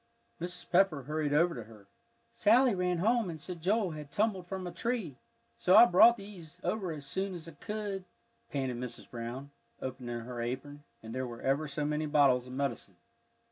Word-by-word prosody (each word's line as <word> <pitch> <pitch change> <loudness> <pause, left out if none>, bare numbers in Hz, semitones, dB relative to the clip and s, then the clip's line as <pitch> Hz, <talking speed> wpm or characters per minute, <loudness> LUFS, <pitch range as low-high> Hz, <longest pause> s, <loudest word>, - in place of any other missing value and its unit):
Mrs. 180 +1 -5
Pepper 175 -6 +4
hurried 150 +1 -1
over 170 +4 +4
to 120 -4 -7
her. 110 -3 -15 0.5
"Sally 240 +3 +4
ran 180 -1 0
home 225 +2 +2
and 160 -2 -6
said 175 +1 -6
Joel 195 +1 +1
had 150 -2 -8
tumbled 200 -4 0
from 190 -1 -4
a 175 - -4
tree, 220 - -3 0.4
so 185 - +4
I - - +11
brought 235 +5 +7
these 180 -5 -11
over 185 -1 -1
as 150 -3 -7
soon's 185 +1 -3
I - - -8
could," 200 +3 -5 0.4
panted 130 -3 -2
Mrs. 120 -1 -6
Brown, 125 +4 -6 0.3
opening 125 -2 -5
her 120 0 -6
apron, 135 +5 -5 0.2
and 110 0 -7
there 130 0 -2
were 120 -1 -9
ever 140 +3 +1
so 145 +1 -3
many 150 +1 -1
bottles 140 -4 +4
of 125 - -9
medicine. 130 -8 -3
155 Hz, 180 wpm, -31 LUFS, 130-190 Hz, 0.5 s, I